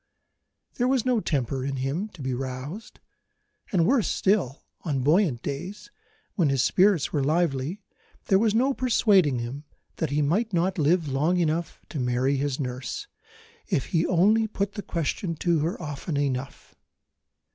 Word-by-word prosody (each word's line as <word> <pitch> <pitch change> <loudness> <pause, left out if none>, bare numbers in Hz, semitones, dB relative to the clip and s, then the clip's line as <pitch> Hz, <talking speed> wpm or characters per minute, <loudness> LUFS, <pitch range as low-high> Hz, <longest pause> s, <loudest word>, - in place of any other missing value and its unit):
There 245 - +2
was 260 -2 +1
no 250 -3 +2
temper 135 - -1
in 135 0 -2
him 135 +10 -2
to 150 - -9
be 130 0 -1
roused; 135 - -6 0.7
and, 175 -4 +3
worse 245 0 +3
still, 185 - 0 0.2
on 140 -6 -2
buoyant 150 - +2
days, 180 +9 -6 0.4
when 170 -8 +2
his 135 -2 +2
spirits 190 -5 +3
were 145 -3 +1
lively, 160 +3 0 0.4
there 190 - +4
was 220 0 +2
no 260 +4 +3
persuading 200 - +3
him 120 +5 -5 0.3
that 160 - -1
he 145 +2 +1
might 205 +9 0
not 180 +2 +1
live 160 +2 +2
long 150 +6 +1
enough 165 0 -1
to 150 - -5
marry 125 +2 +1
his 140 0 -1
nurse, 130 - -4 0.6
if 175 - 0
he 165 -1 +3
only 210 +5 +3
put 200 -1 -2
the 205 - -6
question 170 0 -2
to 170 0 +1
her 160 +4 -2
often 145 -1 -4
enough. 135 -1 -3
160 Hz, 155 wpm, -26 LUFS, 135-195 Hz, 0.7 s, there